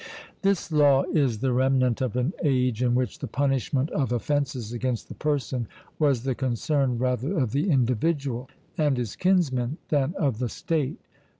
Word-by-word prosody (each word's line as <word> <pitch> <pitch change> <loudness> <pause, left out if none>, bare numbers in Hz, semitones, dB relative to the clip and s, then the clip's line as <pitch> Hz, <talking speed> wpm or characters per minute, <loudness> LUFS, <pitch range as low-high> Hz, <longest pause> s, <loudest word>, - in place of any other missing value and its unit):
This 195 -4 0
law 145 -3 +5
is 130 -8 +1
the 130 -1 +1
remnant 130 -1 +2
of 125 -3 -1
an 125 +7 0
age 125 -5 +1
in 120 -1 +2
which 125 0 -1
the - - -4
punishment 135 +1 0
of 135 -5 -1
offences 130 -2 -1
against 120 -1 -2
the - - -6
person 135 -5 -2 0.3
was 140 -6 +2
the 135 -1 0
concern 130 +1 0
rather 125 - -1
of 130 -7 +1
the 145 +8 0
individual 130 -1 0 0.3
and 145 -4 +2
his 120 -4 -3
kinsmen 150 -8 +1
than 145 +3 +1
of 135 - 0
the 125 -2 -1
state... 155 -2 -2
130 Hz, 165 wpm, -26 LUFS, 125-145 Hz, 0.3 s, law